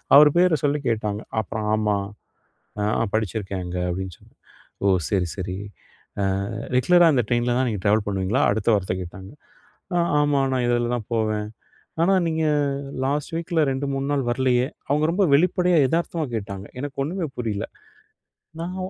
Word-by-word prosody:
அவர் 150 +1 +9
பேரை 180 -3 +4
சொல்லி 145 0 +1
கேட்டாங்க. 105 -2 -1 0.2
அப்புறம் 110 +1 -4
"ஆமா, 105 -1 +1 0.9
அ 105 +2 +1
படிச்சிருக்கேன் 100 -3 -2
அங்கே". 90 0 -3
அப்படின்னு 95 0 -4
சொன்ன. - - -22 0.5
"ஓ - - +4 0.2
சரி 95 -4 +1
சரி. 90 -1 -4 0.9
அ - - -5 0.2
ரெகுலரா 175 +7 +5
அந்த 125 -4 +2
ட்ரெயினில 120 0 +1
தான் 130 - +1
நீங்க 105 -4 -4
ட்ராவல் 105 0 +3
பண்ணுவீங்களா?" 100 +7 0
அடுத்த 105 +1 -1
வார்த்தை 95 -2 -1
கேட்டாங்க. 95 +2 -10 0.6
"ஆ - - +3 0.2
ஆமா 145 -1 +2
நான் 130 -1 +1
இதுல 120 0 +1
தான் 110 -3 -7
போவேன்". 110 -2 0 0.5
"ஆனா 190 +3 +4
நீங்க 160 0 0 0.6
லாஸ்ட் 145 +2 -2
வீக்கில 165 -1 +1
2 135 +2 -2
3 135 +1 -2
நாள் 135 -3 0
வரலையே". 125 +1 +2 0.2
அவங்க 150 +2 +2
ரொம்ப 195 +2 +2
வெளிப்படையா 180 +2 +3
எதார்த்தமா 165 0 -1
கேட்டாங்க. 100 -1 -6
எனக்கு 145 -1 -5
ஒன்னுமே 170 +2 -3
புரியல. 110 -4 -2 0.9
நான் 175 +2 -4
120 Hz, 150 wpm, -23 LUFS, 105-150 Hz, 0.9 s, அவர்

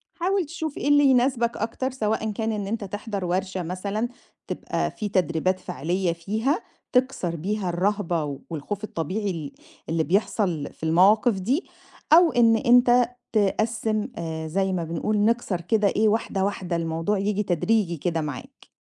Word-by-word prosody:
حاول 370 +1 0
تشوف 315 -1 -5
إيه - - -2
اللي 290 0 +5
يناسبك 250 -2 +3
أكتر 235 +4 -2
سواء 220 -3 -1
إن 220 - -2
كان 220 +2 -1
إن 205 -2 -3
أنت 215 +1 -3
تحضَر 200 0 -4
ورشة 185 +1 -1
مثلًا، 200 +6 -2 0.4
تبقى - - -2
في 210 -2 -4
تدريبات 185 0 +1
فعلية 175 +3 -1
فيها 220 - -1 0.3
تكسَر 250 -10 +1
بيها 195 +3 -2
الرهبة 175 -6 -1
والخوف 180 +7 -5
الطبيعي 200 +2 -2
ال 155 -5 -5 0.4
اللي 165 0 +1
بيحصَل 180 -3 0
في - - -19
المواقف 195 +7 +4
دي، 255 - 0 0.5
أو 335 0 +7
إن 230 -2 +5
أنت 245 +1 +5 0.2
تقسِّم 215 +1 +1
آآ، 160 -1 -4
زي 190 +3 0
ما 175 - -1
بنقول 170 +6 -1
نكسَر 210 -4 +1
كده 210 +4 +2
إيه 215 +2 +2
واحدة، 210 -2 0
واحدة 190 -3 -2
الموضوع 165 +4 -1
ييجي 205 +1 0
تدريجي 180 -1 +1
كده 165 +1 -1
معاك. 145 -4 -7
205 Hz, 155 wpm, -25 LUFS, 175-225 Hz, 0.5 s, أو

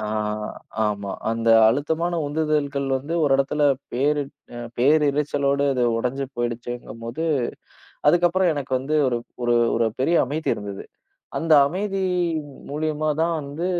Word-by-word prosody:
அ, 110 - -3 0.8
ஆமா. 100 -2 -2 0.2
அந்த 115 0 -1 0.2
அழுத்தமான 160 +7 0
உந்துதல்கள் 145 -2 0
வந்து 145 +6 -4
ஒரு 145 - +3
இடத்துல 145 +2 0 0.3
பேரு 145 +4 +1 0.3
அ - - -6 0.2
பேரிருச்சலோட 140 0 +2 0.3
உடைஞ்சு 125 +4 -1
போயிடுச்சேங்கும்போது. 120 +2 -4 0.8
அதுக்கப்புறம் 175 +2 +3
எனக்கு 135 -2 -5
வந்து 145 +4 -1
ஒரு 120 -1 0 0.6
ஒரு 115 0 +2
பெரிய 165 +6 +3
அமைதி 155 +4 -3
இருந்தது. 100 -1 -7 0.5
அந்த 165 -1 0
அமைதி 195 +4 -2 0.7
மூலியமா 155 +1 -1
தான் 170 0 +1
வந்து 145 +5 -4
145 Hz, 115 wpm, -23 LUFS, 125-155 Hz, 0.8 s, ஒரு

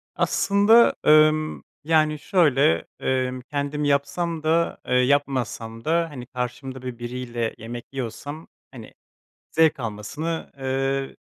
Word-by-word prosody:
Aslında, 205 +3 +4
ımm, 155 0 +4 0.2
yani, 155 -1 +2
şöyle, 140 - +3 0.2
ımm, 130 -1 -1
kendim 145 +2 -3
yapsam 145 +4 0
da, 165 +2 +1
eee, - - -1
yapmasam 125 -4 0
da 165 +1 +1
hani 130 -5 -8
karşımda 125 +1 -5
böyle 125 -2 -7
biriyle 120 -1 -4
yemek 120 +1 -7
yiyorsam, 135 +5 -6 0.2
hani, - - -11 0.6
zevk 160 -3 +3
almasını, 125 +10 -4
ııı, 135 +1 -1
135 Hz, 110 wpm, -24 LUFS, 125-155 Hz, 0.6 s, Aslında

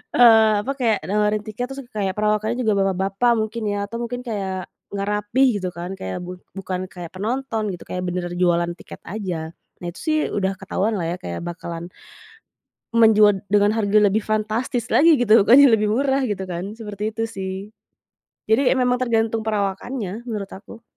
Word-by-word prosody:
eee, 225 -3 +7
apa, 275 - -1
kayak 225 -4 +2
nawarin 210 +1 +1
tiket 220 +4 -4
terus 270 0 -6
kayak 195 -3 -1
perawakannya 215 +2 +1
juga 220 -4 +1
bapak-bapak 195 +5 +1
mungkin 220 +1 -2
ya, 205 - -1
atau 230 +3 -6
mungkin 245 +1 -4
kayak 190 -5 -3 0.3
nggak 200 - -2
rapih 210 +6 +2
gitu 185 - -2
kan, 175 +2 -5
kayak 95 0 -4
bu 180 0 -8 0.2
bukan 185 -1 -3
kayak 175 -3 -9
penonton 225 +3 -2
gitu, 175 - -9
kayak 180 - -4
benaran 175 0 -3
jualan 175 -1 +2
tiket - - -11
aja. 175 -5 -4 0.3
Nah, - - -4
itu 175 - -14
sih 310 -1 +1 0.2
udah 195 -1 0
ketahuanlah 195 0 -1
ya - - -3
kayak 85 - -5
bakalan, 170 0 -6 1.0
menjual 215 -2 +6 0.2
dengan 205 0 +5
harga 210 -2 +2
lebih 205 +1 +2
fantastis 220 +3 -1
lagi 330 +3 +6
gitu, 220 -3 +5
bukannya 275 +5 +8
lebih 210 0 0
murah 270 +1 +1
gitu 205 -5 -3
kan, 180 +4 -4
seperti 210 0 -4
itu 225 +1 -2
sih. 190 -3 -5 0.9
Jadi, 235 +5 +3
memang 250 0 +1
tergantung 225 -2 +1
perawakannya, 210 +1 -3
menurut 210 -4 -3
aku. 220 +4 -12
210 Hz, 170 wpm, -22 LUFS, 190-230 Hz, 1.0 s, bukannya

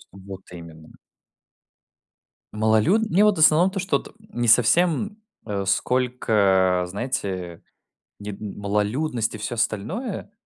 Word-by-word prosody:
Вот 95 0 -10
именно. 80 -2 -12 1.7
Малолюд 110 - +2
Мне 200 +4 +4
вот 210 -2 +3
в - - -3
основном 165 +4 +5
то, 195 - -5
что 190 +2 0
вот - - -14
не 205 - -4
совсем, 175 - +3 0.3
э, 100 -2 -3
сколько, 100 -6 +1
знаете, 95 -5 -4 0.6
не 105 0 -6
д 100 - -10
малолюдность 105 +5 -2
и - - -6
всё 115 +3 -4
остальное. 185 - -3
110 Hz, 120 wpm, -23 LUFS, 100-160 Hz, 1.7 s, основном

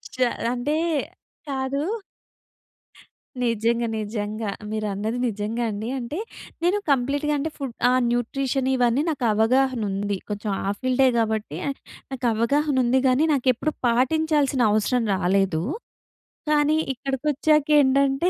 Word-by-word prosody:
జ - - -14 0.4
అంటే, 270 +5 -1 0.7
కాదు. 275 +1 -2 1.6
నిజంగా, 230 0 +1
నిజంగా. 210 0 -3 0.2
మీరు 215 0 -2
అన్నది 215 +4 -2
నిజంగా 220 +2 -2
అండి. 215 +2 -4
అంటే, 255 +6 -5 0.4
నేను 360 +4 +2
కంప్లీట్‌గా 280 +3 +1
అంటే 310 +3 -2
ఫుడ్ 270 -5 -5 0.2
ఆ! - - +3 0.2
న్యూట్రిషన్ 260 +2 -1
ఇవన్నీ 245 +2 +2
నాకు 280 -6 -3
అవగాహన 250 +3 +2
ఉంది. 200 0 -2
కొంచెం 210 +1 -3 0.2
ఆ - - +2
ఫీల్డే 255 +1 +3
కాబట్టి, 220 -8 -1 0.5
నాకు 255 -1 -2
అవగాహన 280 +6 +1
ఉంది 255 +2 +3
గానీ, 260 +5 +3
నాకెప్పుడూ 260 +3 +1 0.2
పాటించాల్సిన 280 +2 +2
అవసరం 230 +3 +1
రాలేదు. 185 -3 +1 0.9
కానీ 300 0 +3 0.2
ఇక్కడికొచ్చాకేంటంటే, 280 +1 +2
250 Hz, 110 wpm, -24 LUFS, 220-280 Hz, 1.6 s, ఆ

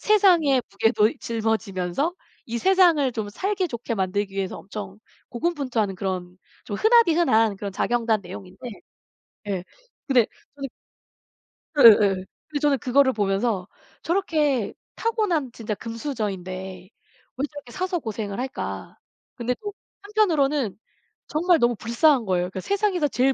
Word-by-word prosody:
세상의 345 - +4
무게도 215 +4 +2
짊어지면서 220 - -1 0.4
이 235 - -1
세상을 340 -7 +4
좀 215 -3 -3
살기 380 - -1
좋게 235 -3 -4
만들기 195 0 -1
위해서 195 -1 -2
엄청 200 -1 -8 0.3
고군분투하는 250 - -1
그런 180 -1 -4 0.3
좀 205 - -4
흔하디흔한 330 - +4
그런 200 -1 -5
자경단 230 0 +1
내용인데 185 +1 -10 0.9
예. 190 -3 -2 0.4
근데 250 -6 +4 0.3
저는 275 -2 -5 1.1
예예. 205 -6 +7 0.2
근데 295 - -2
저는 290 -2 +3
그거를 260 +2 +3
보면서 200 -1 0 0.4
'저렇게 305 - +1 0.2
타고난 410 - 0
진짜 225 -2 -4
금수저인데 190 -6 -5 0.5
왜 265 - -2
저렇게 290 -5 -10
사서 370 +5 -2
고생을 215 -4 -4
할까.' 260 +1 -5 0.4
근데 245 0 -1
또 410 -1 -5 0.3
한편으로는 300 - +1 0.5
정말 345 +3 +3
너무 240 -2 +3
불쌍한 235 +3 +3
거예요. 180 -2 +1
그러니까 185 +1 -5
세상에서 395 -6 +1
제일 265 0 +2
235 Hz, 310 characters per minute, -24 LUFS, 200-305 Hz, 1.1 s, 예예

